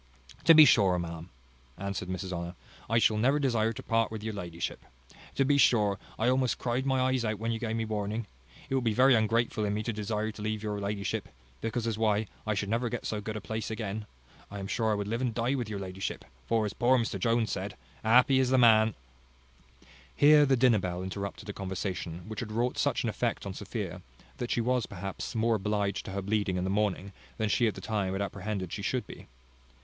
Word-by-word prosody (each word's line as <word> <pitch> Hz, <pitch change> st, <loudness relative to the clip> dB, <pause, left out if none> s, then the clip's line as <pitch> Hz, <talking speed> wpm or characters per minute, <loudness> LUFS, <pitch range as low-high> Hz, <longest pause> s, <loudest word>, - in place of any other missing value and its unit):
"To 165 Hz, -, +9 dB
be 155 Hz, -1 st, +10 dB
sure, 100 Hz, -8 st, +5 dB
ma'am," 85 Hz, 0 st, -5 dB, 0.5 s
answered 100 Hz, -1 st, -4 dB
Mrs 95 Hz, 0 st, -4 dB
Honour, 85 Hz, +1 st, -4 dB, 0.3 s
"I 115 Hz, -, +3 dB
shall 110 Hz, -1 st, +4 dB
never 130 Hz, +7 st, +3 dB
desire 115 Hz, -6 st, +1 dB
to 130 Hz, +3 st, -8 dB
part 115 Hz, -1 st, +1 dB
with 110 Hz, -1 st, -6 dB
your 110 Hz, 0 st, -3 dB
ladyship. 85 Hz, -4 st, -5 dB, 0.5 s
To 135 Hz, -, +3 dB
be 140 Hz, +1 st, +3 dB
sure, 105 Hz, -7 st, +4 dB, 0.2 s
I -, -, +1 dB
almost 130 Hz, 0 st, +2 dB
cried 125 Hz, +2 st, -1 dB
my 130 Hz, -1 st, +2 dB
eyes 130 Hz, -1 st, +1 dB
out 110 Hz, -1 st, -1 dB
when 115 Hz, +3 st, -2 dB
you 115 Hz, -, -2 dB
gave 115 Hz, -1 st, -2 dB
me 115 Hz, 0 st, -1 dB
warning. 105 Hz, +1 st, -2 dB, 0.4 s
It -, -, -4 dB
would 130 Hz, -2 st, +1 dB
be 110 Hz, -3 st, +1 dB
very 130 Hz, +2 st, +6 dB
ungrateful 115 Hz, 0 st, +2 dB
in 105 Hz, 0 st, 0 dB
me 110 Hz, -, -2 dB
to 115 Hz, -, -2 dB
desire 105 Hz, +1 st, -2 dB
to 105 Hz, -, -11 dB
leave 110 Hz, 0 st, -2 dB
your 105 Hz, -1 st, -2 dB
ladyship; 100 Hz, 0 st, -3 dB, 0.3 s
because 115 Hz, +1 st, -2 dB
as 110 Hz, -2 st, -2 dB
why, 110 Hz, -1 st, +2 dB, 0.2 s
I 110 Hz, -, +1 dB
should 100 Hz, 0 st, -2 dB
never 120 Hz, +2 st, 0 dB
get -, -, -4 dB
so 105 Hz, -1 st, -2 dB
good 110 Hz, +1 st, -5 dB
a -, -, -6 dB
place 110 Hz, +2 st, -4 dB
again. 110 Hz, -1 st, -4 dB, 0.4 s
I 100 Hz, -, -7 dB
am 100 Hz, -, -5 dB
sure 110 Hz, +3 st, 0 dB
I 105 Hz, -, +2 dB
would 100 Hz, -1 st, -3 dB
live 115 Hz, +3 st, -2 dB
and 120 Hz, -4 st, -1 dB
die 120 Hz, +3 st, +1 dB
with 125 Hz, -5 st, -2 dB
your 105 Hz, -, -3 dB
ladyship; 95 Hz, 0 st, -5 dB, 0.2 s
for, 115 Hz, -2 st, +2 dB
as 105 Hz, -, -3 dB
poor 125 Hz, +2 st, +3 dB
Mr 115 Hz, -2 st, -1 dB
Jones 115 Hz, -2 st, +1 dB
said, -, -, -4 dB, 0.3 s
happy 125 Hz, +4 st, +5 dB
is 130 Hz, -1 st, +2 dB
the 130 Hz, -, +4 dB
man 110 Hz, -3 st, +5 dB, 0.6 s
" 65 Hz, +1 st, -26 dB
Here 150 Hz, 0 st, +6 dB
the 135 Hz, -1 st, +3 dB
dinner 120 Hz, -3 st, +5 dB
bell 90 Hz, -1 st, -3 dB
interrupted 100 Hz, +2 st, -5 dB
a 105 Hz, -, -4 dB
conversation 95 Hz, -3 st, -4 dB
which 110 Hz, -, -5 dB
had 110 Hz, -2 st, -5 dB
wrought 120 Hz, +3 st, -1 dB
such -, -, +1 dB
an -, -, 0 dB
effect -, -, -2 dB
on 100 Hz, -, -4 dB
Sophia, 100 Hz, -3 st, -5 dB, 0.4 s
that 120 Hz, -, -4 dB
she 120 Hz, -, +1 dB
was, 125 Hz, 0 st, +1 dB
perhaps, 95 Hz, +2 st, -6 dB
more 115 Hz, +1 st, +2 dB
obliged 105 Hz, -1 st, -1 dB
to -, -, -6 dB
her 100 Hz, 0 st, -3 dB
bleeding 100 Hz, -2 st, 0 dB
in 90 Hz, -, -1 dB
the 95 Hz, -, -1 dB
morning, 100 Hz, -1 st, -1 dB, 0.2 s
than 110 Hz, -2 st, 0 dB
she, 115 Hz, +4 st, +3 dB
at 110 Hz, -, -1 dB
the -, -, -8 dB
time, 100 Hz, -4 st, -1 dB
had 95 Hz, -, -2 dB
apprehended 100 Hz, -2 st, -4 dB
she 105 Hz, -, -4 dB
should 125 Hz, +4 st, -1 dB
be. -, -, -11 dB
110 Hz, 230 wpm, -29 LUFS, 100-115 Hz, 0.6 s, be